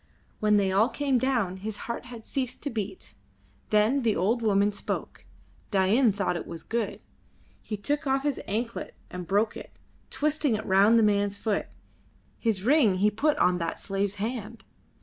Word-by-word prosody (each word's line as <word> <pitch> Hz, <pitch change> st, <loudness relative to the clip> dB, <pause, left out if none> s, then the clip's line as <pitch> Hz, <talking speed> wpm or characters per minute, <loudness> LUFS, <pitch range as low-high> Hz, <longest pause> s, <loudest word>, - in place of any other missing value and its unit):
When 210 Hz, -1 st, +4 dB
they 195 Hz, -2 st, +2 dB
all 210 Hz, +5 st, +3 dB
came 275 Hz, -3 st, +1 dB
down 235 Hz, -9 st, 0 dB
his 210 Hz, +2 st, -5 dB
heart 235 Hz, +1 st, -4 dB
had 235 Hz, -2 st, -10 dB
ceased 260 Hz, -3 st, -3 dB
to 285 Hz, -, -2 dB
beat; 215 Hz, -, -5 dB, 0.6 s
then 215 Hz, +6 st, +3 dB
the 225 Hz, -4 st, +1 dB
old 215 Hz, +8 st, +1 dB
woman 205 Hz, -2 st, +3 dB
spoke; 205 Hz, -, -5 dB, 0.4 s
Dain 210 Hz, +5 st, +3 dB
thought 200 Hz, -2 st, -1 dB
it 170 Hz, -, -5 dB
was 165 Hz, -2 st, -7 dB
good. 230 Hz, -2 st, -3 dB, 0.6 s
He 210 Hz, -, -5 dB
took 290 Hz, +8 st, -1 dB
off 270 Hz, 0 st, +1 dB
his 290 Hz, -2 st, -1 dB
anklet 230 Hz, +3 st, -3 dB, 0.2 s
and 180 Hz, -1 st, -6 dB
broke 205 Hz, +4 st, +1 dB
it, -, -, -8 dB, 0.4 s
twisting 300 Hz, -4 st, +1 dB
it 215 Hz, -, -4 dB
round 200 Hz, +4 st, +5 dB
the 225 Hz, -, +5 dB
man's 205 Hz, -1 st, +2 dB
foot. 215 Hz, -2 st, -1 dB, 0.7 s
His 215 Hz, -5 st, 0 dB
ring 245 Hz, -6 st, +4 dB
he 205 Hz, +3 st, +3 dB
put 295 Hz, +8 st, +1 dB
on 180 Hz, -6 st, +3 dB
that 165 Hz, -1 st, -3 dB
slave's 195 Hz, 0 st, -2 dB
hand. 225 Hz, +1 st, -5 dB
215 Hz, 170 wpm, -27 LUFS, 200-245 Hz, 0.7 s, round